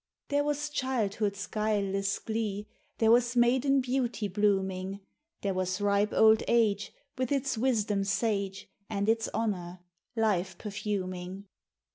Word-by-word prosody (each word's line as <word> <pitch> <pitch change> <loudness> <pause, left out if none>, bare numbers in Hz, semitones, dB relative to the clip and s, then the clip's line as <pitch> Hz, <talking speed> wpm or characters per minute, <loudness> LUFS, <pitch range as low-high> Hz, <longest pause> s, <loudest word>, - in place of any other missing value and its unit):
There 285 0 +2
was 295 0 -1
childhood's 210 -7 -1
guileless 200 -2 0
glee, 215 -2 -3 0.3
There 225 -1 +4
was 240 +1 +4
maiden 260 +3 +4
beauty 245 -4 -1
blooming; 195 -1 0 0.4
There 200 -1 0
was 185 +1 -1
ripe 205 0 +2
old 220 0 +5
age, 215 -3 +2 0.3
With 255 0 -1
its 275 -2 0
wisdom 215 -4 +1
sage, 200 -1 -1 0.2
And 200 -1 -1
its 225 0 +2
honour, 180 -5 -2 0.3
life 210 -5 0
perfuming. 195 -2 -4
210 Hz, 120 wpm, -29 LUFS, 195-235 Hz, 0.4 s, old